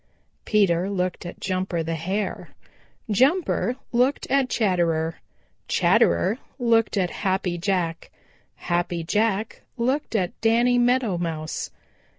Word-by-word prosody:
Peter 190 -4 +2
looked 180 -2 -2
at - - -9
Jumper 185 -3 -2
the 165 +1 -3
Hare. 190 +6 -3 0.6
Jumper 260 - +2 0.2
looked 250 +4 +2
at 270 -2 +3
Chatterer. 170 -7 0 0.5
Chatterer 85 - +3 0.2
looked 230 -4 +2
at 180 -2 +1
Happy 185 -3 0
Jack. 175 -3 -1 0.5
Happy 175 -1 -2
Jack 215 +4 0 0.2
looked 255 +2 -1
at 185 -4 -1
Danny 240 +2 +3
Meadow 240 -6 +2
Mouse. 160 -2 -3
195 Hz, 110 wpm, -24 LUFS, 175-235 Hz, 0.6 s, at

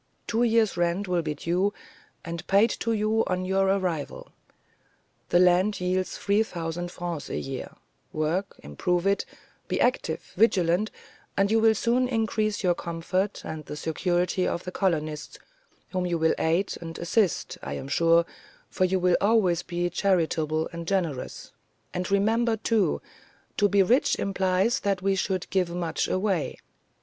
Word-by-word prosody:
Two 230 +1 0
years' 225 -4 +3
rent 175 +3 0
will 180 -1 +1
be 155 -2 -3
due, 180 +7 0 0.5
and 170 -1 -6
paid 205 +4 +4
to 230 - -1
you 220 0 +2
on 185 0 -1
your 190 +1 +2
arrival. 185 -6 -2 1.0
The 175 - +4
land 180 +3 +4
yields 185 +1 -1
three 205 +2 +2
thousand 175 -3 -4
francs 175 -4 -5
a - - -3
year: 135 -1 -5 0.4
work, 160 +6 -2
improve 175 - -1
it, 200 0 +2 0.4
be - - -1
active, - - 0
vigilant, 190 -2 +3 0.5
and 195 +1 +2
you 225 - +4
will 220 0 +5
soon 240 +4 +2
increase 220 -3 0
your 180 -1 +4
comfort 175 +4 -2
and 155 -1 -5
the - - -6
security 175 +3 0
of 170 - -2
the 180 - -5
colonists, 155 -6 -2 0.5
whom 185 -1 -1
you 170 -1 0
will 160 0 +3
aid 170 +5 +1
and 165 -1 -7
assist 185 +2 0
I 70 - -5
am 130 - -6
sure, 165 +3 +4 0.5
for 185 - +2
you 190 +1 +1
will 180 -1 +3
always 200 -5 +3
be 175 -1 -2
charitable 160 -4 +1
and 170 0 -6
generous; 170 -9 -2 0.4
and 180 +2 -3
remember, 220 +3 +2
too, 220 -1 +1 0.5
to 205 -1 +4
be 200 -1 +4
rich 245 +8 +3
implies 195 +5 +1
that 195 -2 -1
we 195 0 +2
should 190 -1 -1
give 180 -1 +1
much 170 -2 -2
away. 185 -4 -1
185 Hz, 155 wpm, -26 LUFS, 170-200 Hz, 1.0 s, will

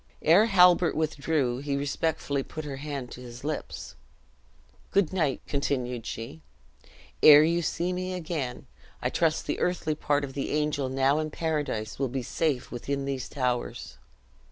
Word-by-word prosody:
Ere 180 +8 +6
Halbert 180 -4 +5
withdrew, 150 -4 0
he 140 0 -2
respectfully 145 0 -1
put 155 +3 -7
her 140 -2 -5
hand 140 -3 -5
to 125 - -9
his 120 0 -10
lips. 150 0 -5 1.0
"Good 195 -3 +2
night," 155 -8 0
continued 125 -4 -2
she, 110 -9 -6 0.8
"ere 150 0 +10
you 170 +2 +2
see 175 +2 -1
me 185 0 -3
again, 155 -8 -4 0.4
I - - 0
trust 160 -2 +1
the - - -2
earthly 175 -3 0
part 145 -1 0
of 135 -1 -5
the 140 - -3
angel 150 -3 0
now 135 +3 +2
in 155 0 -2
paradise 150 -10 -2
will 135 -2 0
be 130 +1 -3
safe 140 +1 -1
within 140 +3 -3
these 135 -2 -3
towers." 125 -3 -3
145 Hz, 155 wpm, -27 LUFS, 130-160 Hz, 1.0 s, ere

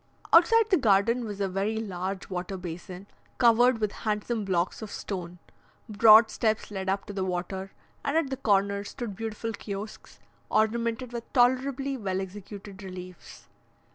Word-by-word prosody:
Outside 435 +6 +6
the 375 - +6
garden 230 0 +3
was 205 -2 -6
a 200 - +1
very 195 +4 -1
large 190 -2 -4
water 185 +1 -4
basin, 180 +2 -8 0.3
covered 240 +1 +5
with 215 -2 -1
handsome 215 +1 -2
blocks 185 +1 -1
of 220 - -6
stone; 180 -4 -6 0.5
broad 220 +1 +7
steps 220 -2 -1
led 190 -1 -3
up 195 +1 -1
to 205 - -7
the 195 -1 -2
water, 190 +1 -3 0.3
and 285 +3 0
at 305 -5 0
the 265 - -2
corner 200 -2 +1
stood 210 0 -6
beautiful 225 +1 -4
kiosks, 200 +1 -8 0.3
ornamented 230 +3 0
with 235 -1 -7
tolerably 265 +2 +2
well 190 -5 -2
executed 195 +1 -8
reliefs. 185 -2 -10
210 Hz, 150 wpm, -27 LUFS, 190-235 Hz, 0.5 s, broad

